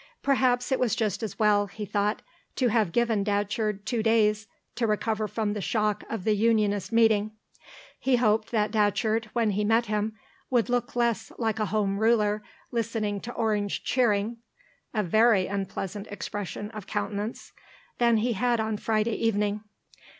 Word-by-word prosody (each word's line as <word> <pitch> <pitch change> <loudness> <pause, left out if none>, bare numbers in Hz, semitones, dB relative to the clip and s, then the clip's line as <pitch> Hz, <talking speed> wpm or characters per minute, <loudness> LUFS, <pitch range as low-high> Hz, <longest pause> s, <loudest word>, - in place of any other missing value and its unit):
Perhaps 255 -2 +2
it 265 - +2
was 235 -3 +1
just 220 -4 -1
as 220 -4 -5
well, 210 -2 +3
he 210 +2 -7
thought, 205 +2 -1 0.3
to 250 -2 +2
have 215 -5 +2
given 230 -1 +1
Datcherd 205 0 -1
two 235 -3 -1
days 215 -1 +2 0.3
to 235 - 0
recover 215 0 0
from 210 0 -2
the 210 - -4
shock 210 0 0
of 225 -5 -4
the 215 +1 +2
Unionist 210 -2 +1
meeting. 220 -2 +3 0.7
He 265 -1 +2
hoped 220 -2 +2
that 215 -2 0
Datcherd, 220 +1 +1
when 230 -3 +2
he 205 +2 0
met 225 +3 +3
him, 215 0 -2 0.3
would 245 -2 +2
look 245 0 -1
less 235 -3 0
like 220 -2 -1
a 215 - 0
Home 200 0 0
Ruler 215 -2 +2 0.3
listening 220 -3 -2
to 240 - -7
Orange 210 -3 -1
cheering 230 -2 +1 0.5
(a 215 -2 0
very 215 +1 +4
unpleasant 195 +1 -4
expression 205 +1 -5
of 215 -4 -8
countenance) 205 +2 -4 0.5
than 235 -1 +4
he 235 +3 +1
had 240 +2 +1
on 220 -1 -1
Friday 220 +1 0
evening. 210 -2 0
215 Hz, 160 wpm, -27 LUFS, 205-230 Hz, 0.7 s, very